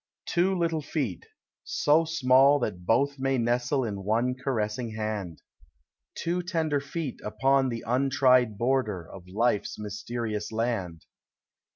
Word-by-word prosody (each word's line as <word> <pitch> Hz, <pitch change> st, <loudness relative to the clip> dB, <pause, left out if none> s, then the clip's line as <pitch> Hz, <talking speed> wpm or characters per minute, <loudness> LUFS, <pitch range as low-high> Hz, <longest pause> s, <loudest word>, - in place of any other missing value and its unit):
Two 185 Hz, +2 st, +1 dB
little 165 Hz, -2 st, 0 dB
feet, 135 Hz, -, -3 dB, 0.4 s
so 150 Hz, -, +2 dB
small 140 Hz, -2 st, +5 dB
that 90 Hz, -9 st, -4 dB
both 140 Hz, +4 st, +2 dB
may 135 Hz, 0 st, +1 dB
nestle 125 Hz, +3 st, +1 dB
In 100 Hz, -4 st, -4 dB
one 115 Hz, +5 st, +1 dB
caressing 115 Hz, -3 st, -3 dB
hand, 105 Hz, -6 st, -4 dB, 0.4 s
— 65 Hz, -, -52 dB
Two 175 Hz, +1 st, -1 dB
tender 165 Hz, -5 st, 0 dB
feet 140 Hz, -1 st, -5 dB
upon 135 Hz, +4 st, +2 dB
the 115 Hz, -1 st, -4 dB
untried 130 Hz, -2 st, +3 dB
border 115 Hz, -8 st, 0 dB
Of 90 Hz, -2 st, -12 dB
life's 105 Hz, +2 st, 0 dB
mysterious 105 Hz, +1 st, -4 dB
land. 110 Hz, -8 st, -2 dB
125 Hz, 130 wpm, -27 LUFS, 105-140 Hz, 0.4 s, small